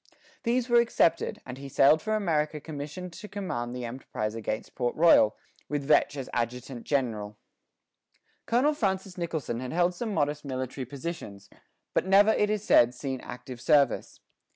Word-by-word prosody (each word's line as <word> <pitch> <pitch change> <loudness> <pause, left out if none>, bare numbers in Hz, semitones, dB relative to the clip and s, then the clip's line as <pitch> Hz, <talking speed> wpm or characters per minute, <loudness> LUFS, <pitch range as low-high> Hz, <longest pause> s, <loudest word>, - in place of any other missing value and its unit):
These 245 0 0
were 240 -1 +5
accepted, 230 -7 +1
and 125 0 -8
he 140 0 -8
sailed 145 +4 +5
for 215 0 -1
America 155 -7 0
commissioned 155 +4 -7
to 210 - -9
command 125 -13 -4
the 125 -1 -4
enterprise 115 -3 -4
against 110 -1 -4
Port 120 -2 -1
Royal, 155 -10 +5 0.3
with 145 -1 -1
Vetch 145 0 +3
as 135 - -5
adjutant 120 +1 -3
general. 110 -7 -1 1.1
Colonel 255 +6 +3
Francis 190 -7 -2
Nicholson 160 -9 -3
had 130 +2 -5
held 175 +1 +2
some 220 +4 -4
modest 150 -4 0
military 130 -1 -4
positions, 125 - -7 0.4
but - - +1
never, 200 +3 +6
it 210 -1 +2
is 210 -1 -1
said, 120 - +5
seen 130 0 -4
active 125 0 -9
service. 145 -5 +2
145 Hz, 155 wpm, -28 LUFS, 125-185 Hz, 1.1 s, never